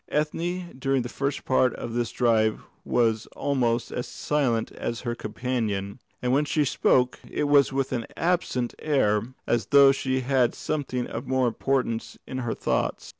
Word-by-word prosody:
Ethne 175 +3 -2
during 135 -1 +1
the 120 - -5
first 140 +2 -3
part 130 -1 +3
of 115 - -6
this 120 0 -1
drive 110 -3 +2 0.2
was 115 -2 +1
almost 120 -4 0
as 125 - -3
silent 130 -7 0
as 115 - -4
her 120 -2 -2
companion; 110 -3 -3 0.2
and 125 - +1
when 140 +3 +3
she 150 0 +1
spoke, 125 -1 +2
it - - -2
was 145 -2 +4
with 135 0 -1
an 115 -2 -2
absent 165 -8 0
air, 105 -9 +2 0.2
as 120 -1 0
though 140 -1 +7
she 130 -1 -1
had 130 -2 +2
something 135 -5 -2
of - - -6
more 130 -1 +2
importance 120 -1 -1
in 130 - -5
her 120 -3 -2
thoughts. - - -1
130 Hz, 165 wpm, -26 LUFS, 120-140 Hz, 0.2 s, though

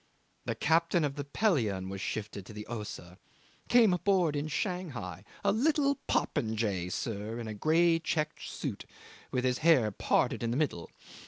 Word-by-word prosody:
The - - -2
captain 165 +2 +2
of 145 -2 0
the 145 - -3
Pelion 130 - +1
was 95 0 -5
shifted 105 +1 -4
into 100 +3 -10
the 105 0 -7
Ossa 105 -6 -7 0.5
came 230 -6 +6
aboard 180 -4 +2
in 145 +1 -1
Shanghai 150 - -3 0.2
a 200 - +4
little 280 +4 +2
popinjay, 105 -6 0
sir, 110 +3 -3
in 115 - -5
a 110 - -4
grey 165 +8 +3
check 150 -2 -1
suit, - - -5 0.4
with 125 -1 -1
his 125 -1 +1
hair 150 -10 +4
parted - - +1
in 115 - -1
the 120 - 0
middle. 140 - -1
135 Hz, 160 wpm, -31 LUFS, 105-170 Hz, 0.5 s, came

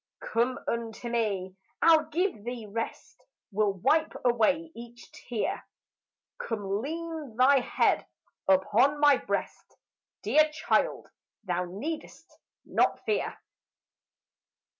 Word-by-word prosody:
"Come 240 +3 +2
unto 235 0 -3
me. 200 -6 -1 0.2
I'll 320 -2 +5
give 330 - -1
thee 240 -1 -5
rest, 225 +3 -6 0.3
Will 205 0 +1
wipe 290 - +2
away 275 +7 +2
each 240 +1 -12
tear; 235 -4 -3 0.8
Come 205 -2 -2
lean 320 -3 -5
thy 265 +3 +5
head 245 - +1 0.4
upon 215 +10 +3
my 290 -2 +6
breast; - - -4 0.5
Dear 305 +9 +4
child, 305 +1 0 0.4
thou 180 -2 -1
need'st 300 - -7 0.3
not - - +1
fear." 430 -2 -1
240 Hz, 100 wpm, -28 LUFS, 215-300 Hz, 0.8 s, my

